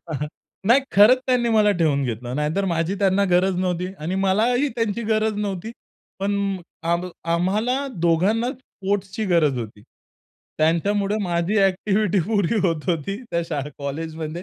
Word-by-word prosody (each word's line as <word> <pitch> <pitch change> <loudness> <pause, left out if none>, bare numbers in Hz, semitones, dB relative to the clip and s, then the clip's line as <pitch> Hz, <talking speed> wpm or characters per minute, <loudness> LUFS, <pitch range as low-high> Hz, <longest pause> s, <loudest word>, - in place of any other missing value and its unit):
हां, 160 -3 -6
हां. 150 - -2 0.4
नाही 250 +4 +6
खरंच 210 +6 +7
त्यांनी 250 -2 +2
मला 210 -1 +5
ठेवून 145 -4 +2
घेतलं. 120 0 -4
नाहीतर 150 +7 0
माझी 170 +1 0
त्यांना 200 0 +3
गरज 180 +1 +3
नव्हती 180 -1 -1
आणि 165 +5 -3
मलाही 240 +8 +2
त्यांची 230 -1 -1
गरज 220 0 +2
नव्हती. 205 +1 -3 0.5
पण 200 +1 0 0.6
आम्हा 175 +1 0 0.2
आम्हाला 215 +11 0 0.2
दोघांनाच 215 - +2
स्पोर्ट्सची 200 -3 -3
गरज 150 -6 +3
होती. 105 -3 -7 0.8
त्यांच्यामुळे 195 +6 +1
माझी 175 +3 0
एक्टिव्हिटी 195 +1 +1
पुरी 210 -1 +1
होत 165 -1 -2
होती 170 +3 -1
त्या 170 0 0
शाळा 145 0 -3
कॉलेजमध्ये 155 +3 -5
190 Hz, 140 wpm, -22 LUFS, 165-210 Hz, 0.8 s, खरंच